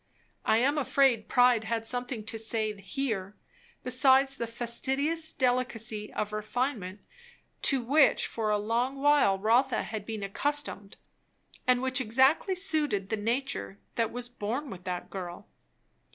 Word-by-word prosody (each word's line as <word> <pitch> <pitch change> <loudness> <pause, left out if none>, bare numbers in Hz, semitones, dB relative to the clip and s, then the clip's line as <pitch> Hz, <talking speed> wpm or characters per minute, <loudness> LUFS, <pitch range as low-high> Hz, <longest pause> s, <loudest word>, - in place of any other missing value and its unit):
I 220 - +4
am 280 +6 +2
afraid 265 -5 +2
pride 245 -3 +4
had 225 0 -2
something 245 -1 -2
to 225 0 -4
say 220 -1 -1
here, 200 -2 -3 0.5
besides 265 +2 +4
the 235 - -3
fastidious 270 +7 -2
delicacy 240 -4 -1
of 210 0 -3
refinement 215 -3 -3 0.6
to 270 -3 +3
which 280 +4 +4
for 220 -2 -2
a 210 - +2
long 235 +6 -1
while 285 -9 +4
Rotha 235 +6 +2
bad 215 -2 -5
been 220 -3 -4
accustomed, 205 -2 -2 0.7
and 250 0 +3
which 260 0 +1
exactly 265 - +3
suited 300 - +1
the 220 - 0
nature 215 - -2 0.2
that 230 -1 0
was 245 0 -4
born 245 +4 -4
with 180 -1 -10
the 180 -1 -3
girl. 180 -3 -7
235 Hz, 135 wpm, -29 LUFS, 215-265 Hz, 0.7 s, I